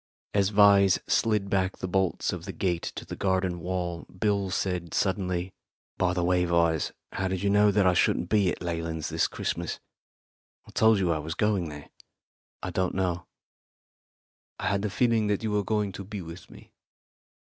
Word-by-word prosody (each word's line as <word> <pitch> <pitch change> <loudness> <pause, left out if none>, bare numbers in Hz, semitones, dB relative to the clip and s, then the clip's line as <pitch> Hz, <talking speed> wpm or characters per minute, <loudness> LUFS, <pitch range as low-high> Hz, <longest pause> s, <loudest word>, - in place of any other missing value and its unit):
As 100 -1 +3
Vyse 100 -2 +6
slid 105 -3 +2
back 95 -1 0
the 95 - -4
bolts 95 0 0
of - - -6
the - - -4
gate 90 -3 -2
in - - -6
the - - -5
garden 95 -2 0
wall, 90 -1 -3
Bill 100 0 0
said 90 -2 -2
suddenly, 95 -1 -1 0.5
"By 90 0 +2
the 90 - 0
way, 90 0 +2
Vyse, 85 -2 +2 0.2
how 95 - -2
did 95 0 -2
you 100 - +2
know 105 +1 +5
that 100 -1 +3
I 90 - +5
shouldn't 90 - +2
be 100 -2 +3
at - - -2
the - - -5
Leylands' 80 -2 -3
this - - +1
Christmas? 85 -1 -3 0.9
I - - -13
told 110 -1 +4
you 90 -3 +1
I 80 - 0
was 80 +2 -5
going 100 -6 +1
there." 75 -1 -10 0.7
"I - - -3
don't 95 -1 -1
know. 90 -2 -1 1.3
I - - -1
had 100 0 0
a - - 0
feeling 115 0 +2
that 105 +1 0
you 110 - -1
were 105 0 +1
going 105 -1 0
to 100 - -7
be 100 -1 -6
with 85 +2 -10
me. - - -15
95 Hz, 190 wpm, -27 LUFS, 85-100 Hz, 1.3 s, Vyse